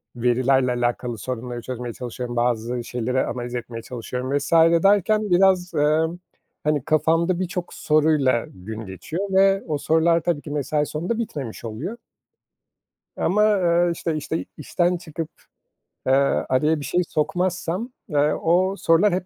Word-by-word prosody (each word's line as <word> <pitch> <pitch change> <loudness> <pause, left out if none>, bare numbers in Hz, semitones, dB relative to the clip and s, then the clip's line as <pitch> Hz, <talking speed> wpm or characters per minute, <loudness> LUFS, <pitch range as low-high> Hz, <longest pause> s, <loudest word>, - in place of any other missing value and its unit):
verilerle 125 +2 +2
alakalı 120 -1 -1
sorunları 120 +1 -5
çözmeye 120 -1 -5
çalışıyorum, 120 0 -6
bazı 120 0 0
şeyleri 125 +2 -1
analiz 120 -1 -4
etmeye 115 -1 -5
çalışıyorum 125 +3 -3
vs. 145 +2 -4 0.3
derken 205 +1 +3
biraz, 180 -1 +3
emm, 155 +3 +2 0.5
hani, 150 -3 +1
kafamda 165 +3 +2
birçok 180 -1 -4
soruyla 150 -5 +2
gün 110 +4 -8
geçiyor 125 - -5
ve 195 0 +4
o 150 -2 -1
sorular 165 +2 +2
tabii 165 -3 -1
ki 145 - -8
mesai 150 +1 0
sonunda 175 +11 -3
bitmemiş 135 - -5
oluyor. 115 - -5 1.2
Ama, 210 +3 +2
eee, 175 -1 +3
işte 165 -1 -3
işte, 160 +2 -3
işten 175 +4 0
çıkıp, 165 -2 -6 0.8
eee, - - +3 0.4
araya 150 +4 +2
bir 145 - -6
şey 180 - +1
sokmazsam, 180 - -1 0.2
eee, 150 0 +2
o 185 +4 +2
sorular 170 +4 +3
hep 185 0 -1
150 Hz, 135 wpm, -23 LUFS, 125-175 Hz, 1.2 s, ve